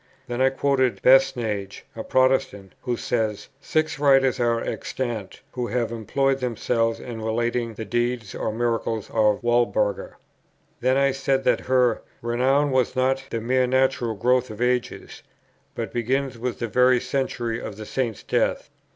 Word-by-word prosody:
Then 120 +1 -3
I 130 - +5
quoted 135 -2 +1
Basnage, 115 -7 +2
a 110 - -5
Protestant, 130 -7 +1
who 125 -2 -2
says, 110 -4 -2
"Six 155 0 -1
writers 135 -2 +4
are 120 -1 +2
extant, 115 -5 -4
who 125 -1 -3
have 120 -2 -1
employed 135 +5 0
themselves 115 -2 -1
in 115 -2 -7
relating 115 +1 -1
the 110 - -6
deeds 120 -3 -2
or 110 - -2
miracles 115 -1 -2
of 105 -1 +2
Walburga." 120 -4 +1 0.6
Then 130 +2 +2
I 140 0 +3
said 135 0 0
that - - +2
her 125 -2 +3 0.2
"renown 130 +5 +2
was 130 -1 +1
not 130 +1 +1
the 115 - -2
mere 125 +2 +1
natural 130 -3 +1
growth 125 +4 +1
of 110 0 -9
ages, 125 0 -2 0.5
but - - -5
begins 130 +3 -1
with 120 +1 -4
the 120 - -3
very 125 +2 +4
century 125 -3 -2
of 100 - -7
the 110 - -7
Saint's 120 -2 -3
death." - - -1
120 Hz, 150 wpm, -24 LUFS, 115-130 Hz, 0.6 s, I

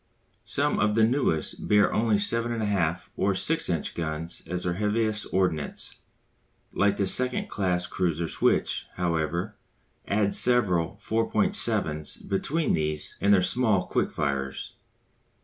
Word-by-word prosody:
Some - - +1
of 105 +1 +1
the 115 - +3
newest 115 - 0
bear 105 -1 +3
only 110 -1 +2
7 115 +3 0
1/2 100 -7 -1
or 100 0 +1
6 165 - +2
inch 85 -4 -2
guns 80 0 -5
as 90 +1 -3
their 90 - -1
heaviest 105 +2 -1
ordnance; 90 -6 -2 0.8
like 100 0 +1
the 100 - +1
second 125 +6 +3
class 90 -3 -1
cruisers 85 -3 -3
which, - - +1
however, 85 +3 -2 0.5
add 100 0 +1
several 95 -10 +3
4.7's 75 -8 +1
between 145 +11 -1
these 75 -1 -3
and 100 - +3
their 95 -3 +4
small 105 +1 +1
quick - - -1
firers. 70 -2 -3
95 Hz, 130 wpm, -26 LUFS, 85-110 Hz, 0.8 s, their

